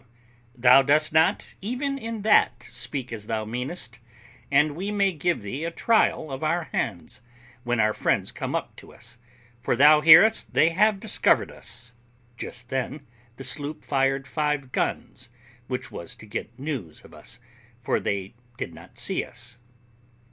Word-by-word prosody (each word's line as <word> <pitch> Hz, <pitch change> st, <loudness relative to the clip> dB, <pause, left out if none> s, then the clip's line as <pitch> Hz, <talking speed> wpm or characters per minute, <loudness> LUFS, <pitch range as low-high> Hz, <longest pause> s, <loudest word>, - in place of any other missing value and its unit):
W. 120 Hz, -1 st, -31 dB, 0.5 s
Thou 125 Hz, +2 st, +8 dB
dost 155 Hz, +3 st, +2 dB
not, 160 Hz, +1 st, +3 dB, 0.2 s
even 270 Hz, +6 st, -2 dB
in 225 Hz, -3 st, -5 dB
that, 125 Hz, -, +4 dB
speak 125 Hz, -1 st, -4 dB
as 105 Hz, -2 st, -7 dB
thou 110 Hz, -1 st, -2 dB
meanest; 120 Hz, +1 st, -5 dB, 0.5 s
and 145 Hz, +1 st, +3 dB
we 190 Hz, +5 st, -4 dB
may 200 Hz, -2 st, +2 dB
give 170 Hz, -, -1 dB
thee 130 Hz, +9 st, -5 dB
a 165 Hz, -, -1 dB
trial 190 Hz, -5 st, +1 dB
of 135 Hz, +3 st, -5 dB
our 170 Hz, +3 st, +1 dB
hands 95 Hz, +2 st, -3 dB, 0.4 s
when 120 Hz, -1 st, -1 dB
our 110 Hz, 0 st, +3 dB
friends -, -, 0 dB
come -, -, -4 dB
up -, -, -4 dB
to -, -, -13 dB
us, 120 Hz, +1 st, -8 dB, 0.4 s
for 120 Hz, -, 0 dB
thou 150 Hz, +4 st, +7 dB
hearest 190 Hz, +8 st, +6 dB
they 160 Hz, -, +5 dB
have 210 Hz, +3 st, +3 dB
discovered -, -, +2 dB
us. 115 Hz, +1 st, -6 dB, 0.4 s
[Just 120 Hz, 0 st, -7 dB
then 135 Hz, +2 st, -3 dB, 0.3 s
the 135 Hz, -, -9 dB
sloop 145 Hz, +3 st, -3 dB
fired 135 Hz, 0 st, +1 dB
five 150 Hz, -4 st, -1 dB
guns, 125 Hz, -1 st, -3 dB, 0.4 s
which 125 Hz, -1 st, -4 dB
was 85 Hz, -, -8 dB
to -, -, -13 dB
get 110 Hz, +2 st, -6 dB
news 130 Hz, -, -6 dB
of -, -, -16 dB
us, -, -, -10 dB, 0.5 s
for -, -, +1 dB
they 100 Hz, +1 st, -3 dB, 0.2 s
did -, -, -5 dB
not -, -, -15 dB
see -, -, -1 dB
us. 125 Hz, 0 st, -9 dB
135 Hz, 160 wpm, -25 LUFS, 120-160 Hz, 0.5 s, Thou